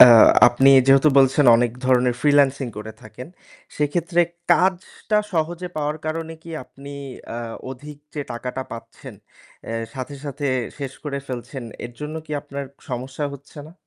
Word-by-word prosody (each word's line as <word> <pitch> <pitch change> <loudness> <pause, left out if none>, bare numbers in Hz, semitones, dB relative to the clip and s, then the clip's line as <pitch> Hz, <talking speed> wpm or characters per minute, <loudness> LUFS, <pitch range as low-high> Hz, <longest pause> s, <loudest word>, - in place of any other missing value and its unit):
আ - - +14 0.4
আপনি 120 +3 +4 0.2
যেহেতু 135 +2 +6
বলছেন 135 +2 +4
অনেক 120 0 +2
ধরনের 125 -1 +3
freelancing 140 -3 +3
করে 110 +1 -7
থাকেন 125 +6 -10 0.5
সেক্ষেত্রে 170 +4 +1 0.3
কাজটা 185 +3 +1 0.2
সহজে 170 +2 -1
পাওয়ার 150 0 -1
কারণে 165 +1 -3
কি 170 - -11
আপনি 140 +2 -13 0.5
আ - - -4 0.3
অধিক 145 +3 -10 0.2
যে 150 - -3
টাকাটা 125 +2 -4
পাচ্ছেন 115 - -10 0.5
এ - - -3 0.2
সাথে, 130 +2 -6
সাথে 145 0 -4 0.3
শেষ 135 -2 -5
করে 140 -2 -3
ফেলছেন, 130 +1 -6 0.2
এর 120 - -7
জন্য 150 +1 -5
কি 155 - -7
আপনার 140 0 -6 0.3
সমস্যা 130 +4 -4
হচ্ছে 140 +3 -14
না? 160 - -14
140 Hz, 145 wpm, -22 LUFS, 130-155 Hz, 0.5 s, আ